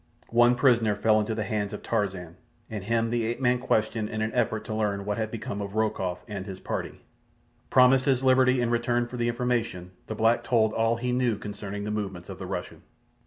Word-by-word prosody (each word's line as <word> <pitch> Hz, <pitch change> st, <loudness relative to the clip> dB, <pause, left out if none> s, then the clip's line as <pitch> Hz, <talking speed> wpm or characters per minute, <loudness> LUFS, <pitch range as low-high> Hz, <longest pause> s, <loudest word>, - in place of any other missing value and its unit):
One 120 Hz, +1 st, +5 dB
prisoner 120 Hz, -5 st, +3 dB
fell 110 Hz, +1 st, +3 dB
into 110 Hz, +1 st, -1 dB
the 110 Hz, -, -1 dB
hands 105 Hz, -1 st, -2 dB
of 105 Hz, -, -7 dB
Tarzan, 95 Hz, -6 st, -2 dB, 0.4 s
and 105 Hz, -3 st, -4 dB
him 115 Hz, +1 st, +1 dB
the 120 Hz, -1 st, 0 dB
ape 115 Hz, +2 st, -2 dB
man 125 Hz, -1 st, +2 dB
questioned 110 Hz, -3 st, 0 dB
in 110 Hz, 0 st, -2 dB
an 110 Hz, -, -2 dB
effort 110 Hz, -3 st, 0 dB
to 110 Hz, -, -4 dB
learn 105 Hz, -2 st, -1 dB
what 105 Hz, +2 st, -2 dB
had 110 Hz, -1 st, -1 dB
become 105 Hz, -2 st, -5 dB
of 100 Hz, +1 st, -6 dB
Rokoff 95 Hz, -5 st, -1 dB
and 100 Hz, -2 st, -6 dB
his 95 Hz, -1 st, -7 dB
party. -, -, -5 dB, 0.7 s
Promised 130 Hz, 0 st, +5 dB
his 135 Hz, -2 st, +2 dB
liberty 130 Hz, -1 st, +4 dB
in 120 Hz, -1 st, 0 dB
return 120 Hz, 0 st, +1 dB
for 125 Hz, +1 st, -8 dB
the 120 Hz, 0 st, 0 dB
information, 115 Hz, -7 st, -2 dB, 0.2 s
the 110 Hz, -, -4 dB
black 115 Hz, +2 st, +2 dB
told 110 Hz, -3 st, +2 dB
all 115 Hz, +1 st, +2 dB
he 125 Hz, +1 st, -2 dB
knew 125 Hz, -3 st, +1 dB
concerning 100 Hz, -1 st, -6 dB
the 105 Hz, -, -3 dB
movements 95 Hz, -4 st, -4 dB
of 95 Hz, -1 st, -8 dB
the 95 Hz, -, -6 dB
Russian. -, -, -5 dB
110 Hz, 215 wpm, -27 LUFS, 105-120 Hz, 0.7 s, One